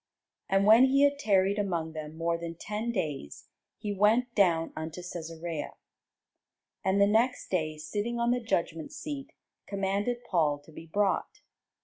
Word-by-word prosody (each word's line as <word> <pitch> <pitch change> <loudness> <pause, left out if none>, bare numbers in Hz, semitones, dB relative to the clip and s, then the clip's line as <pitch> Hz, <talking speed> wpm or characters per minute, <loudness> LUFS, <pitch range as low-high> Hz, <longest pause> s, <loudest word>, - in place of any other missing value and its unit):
And 195 +1 +3
when 225 +5 +8
he 275 +1 +4
had 285 0 +3
tarried 200 -3 +2
among 170 -5 -1
them 155 0 -7
more 170 0 0
than 170 0 -5
ten 210 +6 -3
days, 150 - -4 0.3
he 205 -1 -3
went 225 +5 +3
down 170 -6 +2
unto 160 +2 -5
Cæsarea; 165 -2 -5 1.1
and 190 +1 +2
the 200 - +7
next 230 +5 +1
day 155 -4 -1
sitting 205 +10 -3
on 235 0 +2
the 245 0 +1
judgment 165 -8 -2
seat 285 -2 -6 0.4
commanded 200 +5 -1
Paul 155 -9 +1
to 160 - -15
be 160 +1 -11
brought. 200 +4 0
195 Hz, 150 wpm, -29 LUFS, 165-225 Hz, 1.1 s, when